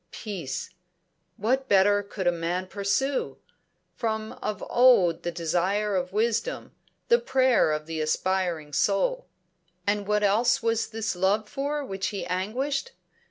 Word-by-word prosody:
Peace! 180 - -5 0.7
What 260 +6 0
better 205 +1 +5
could 200 -1 -6
a 175 - +5
man 175 +2 -2
pursue? 205 +8 -1 0.6
From 220 -2 -3
of 210 -3 -3
old 235 -10 +5
the 175 - -2
desire 185 +5 0
of 180 -1 -1
wisdom, 230 - -1 0.4
the 475 0 +6
prayer 260 - +3
of 150 0 -2
the 160 0 -4
aspiring 170 -2 -1
soul. - - +1 0.6
And 205 0 0
what 210 0 +1
else 225 +4 +3
was 230 -1 +1
this 220 -4 -3
Love 200 +4 +1
for 285 +4 -3
which 195 -4 -3
he 200 - -4
anguished? 260 - -2
205 Hz, 135 wpm, -26 LUFS, 185-235 Hz, 0.7 s, the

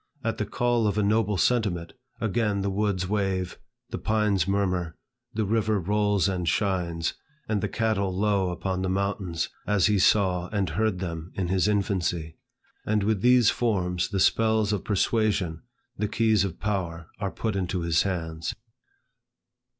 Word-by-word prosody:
At 115 -1 -2
the 105 - -1
call 120 -1 +1
of 100 0 -1
a 105 - +2
noble 105 -1 +2
sentiment, 95 -8 +1 0.3
again 105 -2 0
the 100 - 0
woods 95 -2 0
wave, 95 -3 -1 0.3
the - - -3
pines 105 -5 +1
murmur, 90 -4 0 0.4
the 110 -1 0
river 110 0 +1
rolls 105 +1 +1
and 90 -3 -1
shines, 85 -5 0 0.3
and 105 -2 0
the 105 - -1
cattle 105 -3 0
low 100 0 +1
upon 90 +1 -2
the 95 - -1
mountains, 95 -3 -1 0.2
as 105 -3 +3
he 105 -2 +3
saw 95 -2 +3
and 100 -5 -1
heard 105 +3 0
them 85 -2 -5
in 90 -3 -2
his 95 +1 +2
infancy. 90 -6 0 0.5
And 105 -1 +1
with 105 -1 +1
these 125 -2 +5
forms, 90 -7 0
the 100 -1 -1
spells 110 +1 +3
of 100 - -2
persuasion, 100 -5 0 0.4
the 105 - +1
keys 110 -2 +2
of 95 -4 -4
power 90 -5 -3
are 100 -2 -1
put 110 +1 -3
into 90 -1 -1
his 85 0 +2
hands. 80 -3 -3
100 Hz, 160 wpm, -26 LUFS, 90-105 Hz, 0.5 s, these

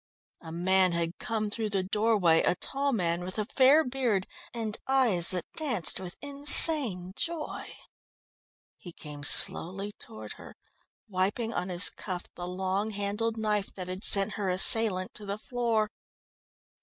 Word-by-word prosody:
A 160 - -10
man 185 +2 +1
had 170 0 -3
come 215 -3 -3
through 220 0 -3
the 195 -2 0
doorway, 200 -4 +1
a - - +1
tall 275 +9 -3
man, 175 -6 -1
with 185 +3 -7
a 215 - -1
fair 275 +7 +4
beard 245 -8 -2 0.3
and 225 -3 -5
eyes 235 -11 +1
that 180 -3 -3
danced 250 - +2
with 180 -2 -9
insane 280 - +1
joy. 335 -2 -5 1.1
He 175 - -11
came 150 -2 -10
slowly 190 +6 +3
toward 110 -1 -10
her, - - -14 0.5
wiping 205 +4 -2
on 180 +1 -4
his 180 0 +3
cuff 185 -3 -7
the 175 - -8
long 190 +3 -3
handled 210 +2 -3
knife 210 -2 -2
that 185 -2 -7
had 185 +3 -6
sent 200 +1 +6
her 195 - -1
assailant 185 0 +5
to 210 - -7
the 200 +1 -4
floor. 225 -2 -2
200 Hz, 150 wpm, -27 LUFS, 180-230 Hz, 1.1 s, sent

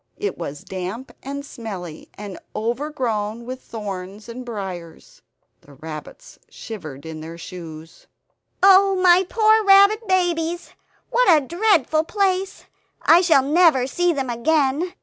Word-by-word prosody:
It 415 - -3
was 145 +1 -7
damp 190 +7 -6
and 280 +1 -6
smelly, 195 - -8
and 205 -3 -8 0.2
over 235 +7 -2
grown 230 -5 -3
with 255 +1 -7
thorns 200 -2 -7
and 240 +2 -8
briars. 190 -8 -8 0.4
The 140 - -17
rabbits 155 - -10
shivered 155 - -9
in 160 -1 -7
their 165 +1 -9
shoes. 165 -2 -10 0.6
"Oh 390 0 +6
my 365 0 +4
poor 435 0 +4
rabbit 400 +2 +5
babies! 350 -2 0 0.4
What - - +3
a 305 -5 +5
dreadful 340 - +2
place; 385 +1 -1 0.4
I 340 +2 +6
shall 320 -7 +4
never 300 -3 +4
see 350 +6 +1
them 270 -5 -2
again!" 290 +6 0
265 Hz, 130 wpm, -21 LUFS, -, 0.6 s, Oh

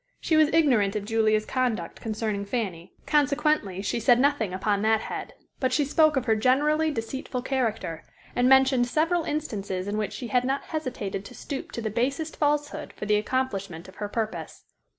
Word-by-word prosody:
She 320 - +1
was 310 -1 +5
ignorant 245 -11 +3
of 205 -1 -2
Julia's 215 -1 +2
conduct 240 -10 -2
concerning 215 -2 -2
Fanny, 200 -6 -4
consequently 290 - +1
she 220 - -1
said 240 +1 +4
nothing 275 -7 +2
upon 200 +2 0
that 220 0 +3
head, - - -6 0.2
but 260 -2 +1
she 290 +2 +2
spoke 310 +2 +4
of 255 - 0
her 220 -2 +3
generally 295 +7 +2
deceitful 250 0 -4
character, 220 - -2 0.3
and 245 +1 +3
mentioned 265 -2 +5
several 325 +5 +1
instances 200 -11 -3
in 210 +1 -1
which 210 - -2
she 245 - -6
had 250 -1 +2
not 270 +2 -1
hesitated 245 - -4
to 250 - -11
stoop 280 -2 -6
to 235 - -4
the 220 - -2
basest 275 +8 -1
falsehood 295 0 -1
for - - -6
the 210 0 +3
accomplishment 200 -7 -2
of 190 - -15
her 205 -1 -4
purpose. 220 0 -4
245 Hz, 180 wpm, -26 LUFS, 210-280 Hz, 0.3 s, was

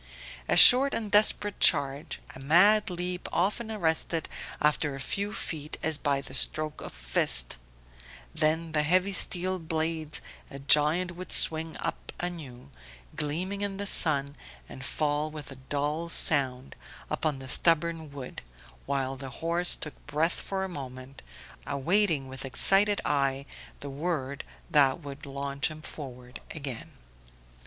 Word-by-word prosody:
A - - +3
short 270 +3 +8
and 215 -3 -2
desperate 205 -1 +3
charge, 145 +1 +1
a - - -10
mad 200 +10 +5
leap 180 0 -4
often 210 +5 -1
arrested 165 -4 -1 0.3
after 150 -1 0
a - - -8
few 200 +10 -3
feet 155 -6 -3
as 160 -2 0
by 140 -2 0
the 130 - -11
stroke 155 +3 0
of - - -6
a - - -7
giant - - -15
fist; - - +2 0.8
then 160 +1 0
the 155 -1 +1
heavy 185 +6 +1
steel 185 +1 +2
blades 160 -1 -2 0.3
a 140 - -9
giant 150 +6 +4
would 185 0 -9
swing 160 0 0
up - - -5
anew, 145 - -7 0.4
gleaming 180 +7 -3
in 200 -1 -3
the 200 - -3
sun, 140 -7 +4 0.3
and 130 - -10
fall 150 +3 -1
with 150 -2 -8
a - - -9
dull 150 +4 -2
sound 135 -5 +1 0.4
upon 155 -3 -1
the 135 0 -9
stubborn 165 +1 +2
wood, 135 -3 -8 0.5
while 135 -1 -2
the 135 0 -8 0.2
horse 175 +1 +2
took 150 - -7
breath 155 +3 +1
for 195 -1 -4
a - - -3
moment, 130 -5 -9 0.5
awaiting 155 0 +1
with 130 0 -8
excited 195 - +4
eye 140 -1 0 0.4
the 140 - -6
word 140 -2 -3 0.2
that 140 -1 +3
would 145 -2 -10
launch 140 0 -3
him 155 0 -10
forward 125 -5 -9
again. 135 -6 -7
155 Hz, 145 wpm, -28 LUFS, 140-175 Hz, 0.8 s, short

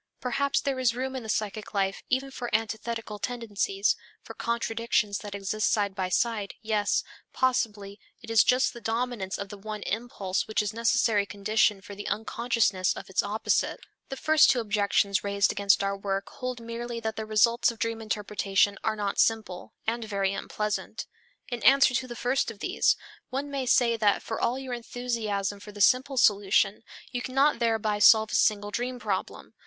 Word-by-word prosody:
Perhaps 280 +3 0
there 275 -2 -2
is 240 -2 +2
room 260 +1 -3
in 260 - -3
the 220 - -9
psychic 215 -1 -3
life 195 -1 0
even 270 +1 0
for 245 -2 -5
antithetical 220 -1 -3
tendencies, 210 -3 -1 0.3
for - - -9
contradictions 230 -3 -1
which 205 -2 -7
exist 205 +2 -1
side 205 -2 +1
by 190 -1 -2
side, 215 0 0
yes, 215 -2 +1 0.3
possibly 210 -6 -1 0.2
it 225 -1 -9
is 225 -2 +6
just 255 +1 +2
the 235 - -10
dominance 225 -4 -2
of 200 - -6
the 205 - -9
one 215 0 -6
impulse 210 -5 -2
which 215 -1 0
is 210 - -2
the 225 - -12
necessary 225 -3 +2
condition 210 0 +1
for 200 - -10
the 205 +1 -7
unconsciousness 220 -4 0
of - - -9
its 185 - +2
opposite. 210 +2 0 0.3
The 270 - -5
first 310 +2 +5
two 250 - +3
objections 200 -2 +1
raised 200 0 +2
against 200 -1 +2
our 195 0 0
work 195 0 -3
hold 255 -2 -5
merely 230 +1 -5
that 220 -1 -3
the 220 -1 -5
results 225 +3 +3
of 230 - -6
dream 230 0 -2
interpretation 205 -2 0
are 220 - 0
not 205 -2 -2
simple, 215 -5 0
and 230 +1 -1
very 200 -2 -1
unpleasant. 210 +1 -3 0.4
In 240 -2 -4
answer 275 -1 +6
to 255 +1 -1
the 240 - -7
first 250 +2 0
of 225 - -8
these, 210 - +2 0.3
one 280 +2 -3
may 270 -2 -2
say 235 -1 +4
that 210 -2 +2
for 225 - -4
all 245 - +1
your 265 -2 -5
enthusiasm 225 -5 -3
for 210 - -11
the 205 - -11
simple 260 +5 +3
solution, 205 -3 +3 0.3
you 245 - -3
cannot 270 +2 +2
thereby 220 -3 +1
solve 220 +1 +6
a - - -6
single 205 -1 +2
dream 245 +3 -3
problem. 205 -5 -4
220 Hz, 180 wpm, -27 LUFS, 205-240 Hz, 0.4 s, is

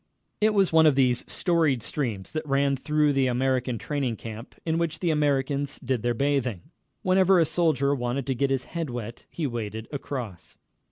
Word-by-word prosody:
It 215 0 +3
was 195 -4 +3
one 160 -1 +7
of 150 - +4
these 125 -3 +3
storied 160 - +1
streams 115 -7 -3
that 155 -1 -4
ran 140 0 +2
through 150 +2 +1
the 135 -1 +2
American 125 -1 0
training 135 -2 -2
camp, 110 +2 -9
in 165 0 0
which 170 -2 -1
the 175 -3 0
Americans 145 -1 0
did 125 -3 -2
their 120 +1 0
bathing. 130 -7 -1 0.3
Whenever 185 0 +4
a 165 - +5
soldier 145 -4 +2
wanted 125 0 -2
to 135 - 0
get 140 +2 0
his 135 -1 0
head 165 -3 -4
wet 120 -1 -6
he 165 - -3
waded 110 -3 -4
across. 125 - -6
140 Hz, 180 wpm, -26 LUFS, 120-155 Hz, 0.3 s, one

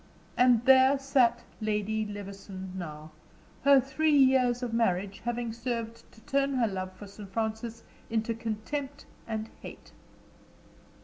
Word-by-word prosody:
And 245 -2 +4
there 265 +1 +6
sat 270 -3 +2 0.2
Lady 215 0 -1
Levison 195 -2 -8
now, 155 -3 -7 0.5
her 280 0 +7
three 290 +4 +2
years 260 -2 +4
of 240 -2 -3
marriage 195 -3 0
having 240 -1 -2
served 230 -1 -5
to 220 - -19
turn 275 +2 0
her 245 -3 +3
love 185 -2 -4
for 185 +2 -11
Sir 200 +1 -11
Francis 220 +3 -3 0.3
into 225 0 0
contempt 245 +6 -5 0.2
and 220 -1 -3
hate. - - -11
230 Hz, 130 wpm, -29 LUFS, 205-260 Hz, 0.5 s, her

